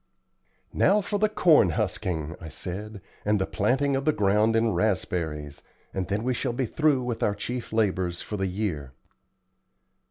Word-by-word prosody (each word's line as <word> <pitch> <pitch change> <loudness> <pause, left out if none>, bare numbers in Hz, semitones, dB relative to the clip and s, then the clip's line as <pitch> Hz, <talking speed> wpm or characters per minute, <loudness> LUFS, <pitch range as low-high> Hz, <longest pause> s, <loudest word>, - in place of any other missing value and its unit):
"Now 205 - +4
for 205 +1 -2
the 215 +1 +3
corn 160 - +5
husking," 80 -3 -2
I 80 - -7
said, 100 +6 -6 0.2
"and 105 0 +2
the 95 - +1
planting 135 +9 +1
of 135 - -1
the 155 - +3
ground 105 -1 +2
in 115 0 +3
raspberries, 85 -6 -1 0.3
and 95 -2 -2
then 105 +2 -1
we 130 +1 +1
shall 125 0 -2
be 130 +2 -1
through 145 +1 +2
with 120 -2 -3
our 100 - +1
chief 120 +3 -5
labors 95 -5 0
for 105 - -4
the 95 -1 -1
year." 90 -9 -3
105 Hz, 165 wpm, -26 LUFS, 90-125 Hz, 0.3 s, corn